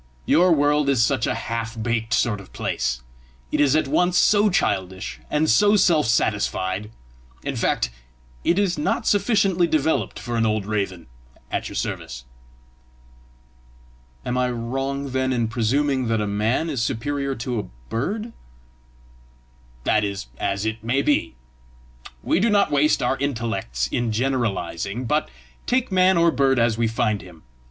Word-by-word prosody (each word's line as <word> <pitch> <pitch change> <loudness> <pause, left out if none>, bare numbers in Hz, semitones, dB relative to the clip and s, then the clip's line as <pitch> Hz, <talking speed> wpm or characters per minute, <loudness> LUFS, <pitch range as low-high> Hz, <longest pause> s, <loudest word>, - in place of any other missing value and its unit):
Your 180 - +4
world 145 -2 +3
is 130 -5 +3
such 130 -1 +1
a - - 0
half 115 0 -4
baked 115 0 -1
sort 105 -4 +1
of 95 - -16
place, 65 0 -2 0.5
it - - 0
is 145 -1 +4
at 155 -2 +2
once 175 +5 +2
so 210 0 +4
childish 95 - -1
and 150 +1 +1
so 205 - +5
self 170 - +3
satisfied 105 -2 0 0.5
in - - -3
fact, 60 - 0 0.5
it 175 - +2
is 195 -4 +1
not 220 +9 0
sufficiently 195 -4 +2
developed 160 -1 0
for 120 -1 -4
an 115 - +2
old 110 -2 0
raven 100 -5 -2 0.5
at - - -2
your - - -9
service!" 65 +1 -4 2.0
"Am 125 +1 -1
I 125 0 +1
wrong, 135 +3 -3
then, 130 0 0
in 120 -3 0
presuming 130 +3 0
that 115 -1 +1
a 105 - 0
man 105 +9 0
is 140 -7 -2
superior 140 +3 -2
to 120 0 -3
a - - -3 0.3
bird?" 210 - -3 1.5
"That 105 +9 +2
is 100 -11 -4
as 100 +2 -1
it 110 0 -3
may 130 +5 +1
be. 145 - +1 0.9
We - - +2
do 225 +4 +3
not 205 -1 +3
waste 145 0 +3
our 130 +2 +1
intellects 110 - -2
in 120 -2 0
generalising, 115 -3 -2
but 150 +5 0 0.4
take 255 -3 +1
man 185 0 +4
or 170 0 +4
bird 135 -2 +2
as 115 -1 +2
we 115 0 +1
find 110 -2 0
him. 90 -4 -15
125 Hz, 155 wpm, -23 LUFS, 110-150 Hz, 2.0 s, so